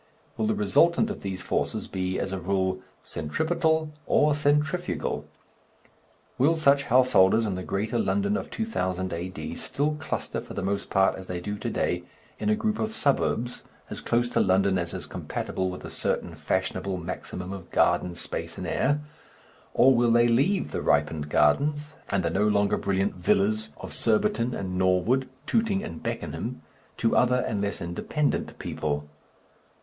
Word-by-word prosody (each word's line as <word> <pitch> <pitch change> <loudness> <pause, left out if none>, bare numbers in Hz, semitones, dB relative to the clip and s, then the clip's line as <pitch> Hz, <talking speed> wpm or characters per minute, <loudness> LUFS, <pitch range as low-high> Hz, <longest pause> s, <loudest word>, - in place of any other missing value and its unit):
Will 215 - 0
the 215 - +1
resultant 205 0 +3
of - - -7
these 95 -2 -4
forces - - -1
be, 95 0 -2
as 95 - -2
a 95 - -2
rule, 95 0 0 0.2
centripetal 160 - 0 0.2
or 150 0 +4
centrifugal? 150 +4 0 1.1
Will 150 +6 +4
such 140 -3 +4
householders 115 -4 +5
in 100 - -1
the 95 - -4
greater 105 +5 -1
London 205 - +1
of - - -3
2000 95 - -2
A.D. 90 +2 -5
still 145 +2 -1
cluster 160 - -3
for - - -10
the 100 - -3
most 100 +1 -2
part, 95 0 +3
as 95 0 -8
they 90 -1 -3
do 105 +4 -4
to 105 - -4
day, - - 0 0.4
in - - 0
a 215 - +4
group 215 0 -1
of 220 0 -2
suburbs 125 -3 0 0.3
as - - -5
close 120 +1 +1
to - - +2
London 95 0 +3
as 85 -1 -3
is - - -5
compatible 95 0 -3
with 90 - -7
a - - -7
certain - - -2
fashionable 95 0 -2
maximum 90 +2 -5
of 95 -3 -9
garden 90 -1 +2
space - - -5
and - - -5
air; 145 +2 +1 0.7
or 135 +1 +6
will 120 0 +3
they 120 +1 +5
leave 140 +12 +2
the - - -2
ripened 75 +1 +1
gardens 145 - +2 0.2
and 95 -2 +1
the 85 - +1
no 100 +4 +2
longer 100 -1 +3
brilliant 95 +1 0
villas 100 +2 +2
of - - -8
Surbiton 120 - +1
and 90 -1 -3
Norwood, 95 +9 +2 0.2
Tooting 215 0 +1
and 220 - -7
Beckenham, 115 - -4 0.3
to 115 - +1
other 125 0 +4
and 105 -2 -1
less 100 0 -2
independent 115 - -2
people? 75 -1 -3
110 Hz, 165 wpm, -27 LUFS, 95-150 Hz, 1.1 s, or